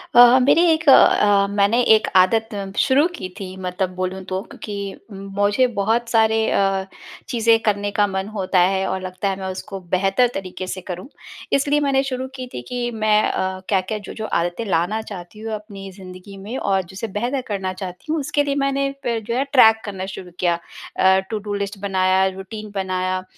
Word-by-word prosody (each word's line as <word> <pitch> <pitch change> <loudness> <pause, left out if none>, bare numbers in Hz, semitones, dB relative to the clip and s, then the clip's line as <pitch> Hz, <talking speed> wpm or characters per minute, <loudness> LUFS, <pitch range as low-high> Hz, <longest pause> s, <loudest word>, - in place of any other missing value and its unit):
अ - - +8
अ, 245 +1 +9
मेरी 280 +6 +4
एक 320 0 0
अ, 205 -6 +6
मैंने 205 +4 +3
एक 215 - 0
आदत 220 +5 +4 0.3
शुरू 280 +3 +4
की 185 - -6
थी 185 -1 -7
मतलब 180 0 -2
बोलूँ 185 +1 -3
तो 190 0 -3
क्योंकि 200 -2 -7 0.2
मुझे 200 +4 0
बहुत 230 +4 +1
सारे 220 -1 +3
अ, 195 -1 +1 0.4
चीज़ें 230 -2 +3
करने 205 -1 0
का 205 0 +2
मन 190 0 -3
होता 190 -2 +1
है 190 +2 +2
और 190 - -2
लगता 185 +2 -3
है 195 - -1
मैं 190 - -4
उसको 195 +1 -7 0.2
बेहतर 195 +7 +3
तरीक़े 185 -1 -6
से 185 0 -5
करूँ, 180 +2 -7 0.5
इसलिए 285 +2 +2
मैंने 275 -2 +2
शुरू 260 -1 -3
की 255 -1 -6
थी - - -5
कि 245 -1 -2
मैं 215 -1 +2
अ, 185 0 -2
क्या-क्या, 195 +1 0
जो-जो 215 +1 -7
आदतें 175 +4 -1
लाना 190 +3 0
चाहती 200 -2 -10
हूँ 220 0 -5
अपनी 205 -2 -8
ज़िंदगी 185 +1 -11
में 230 +6 -5
और 195 -5 +1
जिसे 195 +4 -4
बेहतर 255 +4 -1
करना 195 -3 -3
चाहती 185 - -7
हूँ 320 - +1
उसके 290 +1 0
लिए 280 -1 -1
मैंने 275 0 0
पे 230 -1 -1
जो 230 +2 -3
है 260 - +1
ट्रैक 225 -5 +6
करना 190 -3 -5
शुरू 180 -1 -10
किया 175 -1 +2 0.4
अ, 190 0 +5
टूडू 210 -2 -4
लिस्ट 200 0 -3
बनाया 190 -1 +2
रूटीन 210 +2 -8
बनाया, 185 -1 -1
200 Hz, 185 wpm, -21 LUFS, 190-230 Hz, 0.5 s, अ